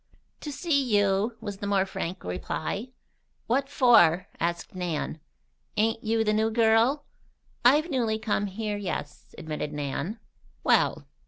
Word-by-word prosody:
"To 295 Hz, -, -6 dB
see 285 Hz, -2 st, +1 dB
you," 205 Hz, +3 st, +1 dB
was 205 Hz, -3 st, -5 dB
the 200 Hz, -, -5 dB
more 195 Hz, -1 st, +2 dB
frank 185 Hz, -1 st, -5 dB
reply. 155 Hz, -, -3 dB, 0.6 s
"What 270 Hz, +4 st, 0 dB
for?" 185 Hz, -, +5 dB
asked 170 Hz, 0 st, -2 dB
Nan. 175 Hz, -4 st, -3 dB, 0.6 s
"Ain't 225 Hz, +1 st, +1 dB
you 225 Hz, 0 st, +1 dB
the 215 Hz, -1 st, +1 dB
new 220 Hz, +1 st, +2 dB
gal?" 230 Hz, +5 st, +3 dB, 0.6 s
"I've 300 Hz, +7 st, +4 dB
newly 230 Hz, -5 st, +1 dB
come 210 Hz, -1 st, -1 dB
here, 210 Hz, +1 st, -3 dB
yes," 180 Hz, -7 st, -6 dB
admitted 150 Hz, -1 st, -4 dB
Nan. 150 Hz, -, -3 dB, 0.4 s
"Well!" -, -, +2 dB
215 Hz, 135 wpm, -27 LUFS, 180-230 Hz, 0.6 s, for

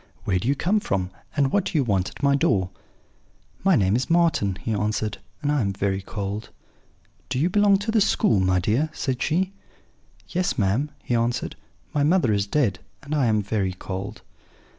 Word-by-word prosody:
'Where 90 Hz, -2 st, +1 dB
do 115 Hz, -, -3 dB
you 140 Hz, -, +3 dB
come 185 Hz, +9 st, +1 dB
from, 95 Hz, -, -2 dB, 0.3 s
and 140 Hz, -2 st, +3 dB
what 200 Hz, -2 st, +2 dB
do -, -, -1 dB
you 145 Hz, -, +3 dB
want 100 Hz, -6 st, 0 dB
at -, -, -13 dB
my 140 Hz, 0 st, +4 dB
door?' 95 Hz, -9 st, +1 dB, 0.9 s
"'My 190 Hz, -1 st, +5 dB
name 100 Hz, -4 st, +3 dB
is 125 Hz, -, -1 dB
Marten,' 165 Hz, -, +2 dB
he 115 Hz, -, -1 dB
answered, 105 Hz, +1 st, -1 dB, 0.2 s
'and 145 Hz, -, +1 dB
I 145 Hz, -2 st, +2 dB
am 100 Hz, -3 st, 0 dB
very 95 Hz, 0 st, -1 dB
cold.' 100 Hz, +1 st, -5 dB, 0.8 s
"'Do 130 Hz, -, -1 dB
you 165 Hz, +7 st, +1 dB
belong 205 Hz, 0 st, +5 dB
to 205 Hz, +3 st, -2 dB
the 220 Hz, -1 st, +3 dB
school, 200 Hz, -, +3 dB
my 95 Hz, 0 st, +2 dB
dear?' 115 Hz, -, +1 dB
said 130 Hz, -3 st, -2 dB
she. 185 Hz, +4 st, 0 dB, 0.7 s
"'Yes, 180 Hz, 0 st, -1 dB
ma'am,' 110 Hz, +9 st, +1 dB
he -, -, -2 dB
answered; 120 Hz, +1 st, 0 dB, 0.4 s
'my 145 Hz, -, +1 dB
mother 150 Hz, -, +3 dB
is 100 Hz, 0 st, 0 dB
dead, 105 Hz, -8 st, +1 dB, 0.2 s
and 145 Hz, +1 st, -5 dB
I 140 Hz, -5 st, +2 dB
am 110 Hz, -2 st, +2 dB
very 100 Hz, -2 st, -1 dB
cold.' 95 Hz, +1 st, -6 dB
120 Hz, 190 wpm, -24 LUFS, 100-155 Hz, 0.9 s, My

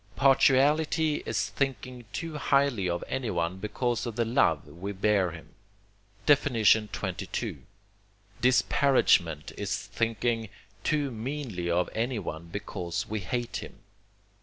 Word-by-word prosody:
Partiality 150 Hz, +3 st, +3 dB
is 95 Hz, +2 st, 0 dB
thinking 125 Hz, +1 st, -3 dB
too 165 Hz, -2 st, -4 dB
highly 140 Hz, -10 st, +2 dB
of 85 Hz, 0 st, -2 dB
anyone 95 Hz, -8 st, -2 dB
because 120 Hz, +4 st, -2 dB
of 115 Hz, -, -5 dB
the 115 Hz, -, +1 dB
love 110 Hz, -, +2 dB
we 90 Hz, +7 st, -6 dB
bear 100 Hz, -1 st, +2 dB
him. 80 Hz, -1 st, -11 dB, 0.7 s
XXII. 115 Hz, -7 st, +2 dB, 0.8 s
Disparagement 125 Hz, -, +3 dB
is -, -, -1 dB
thinking 115 Hz, 0 st, -1 dB, 0.3 s
too 145 Hz, -3 st, 0 dB
meanly 115 Hz, -7 st, -4 dB
of 90 Hz, +1 st, +2 dB
anyone 110 Hz, -9 st, -3 dB
because 90 Hz, -2 st, -4 dB
we 110 Hz, 0 st, -2 dB
hate 120 Hz, +5 st, -3 dB
him. -, -, -8 dB
115 Hz, 110 wpm, -28 LUFS, 95-135 Hz, 0.8 s, Partiality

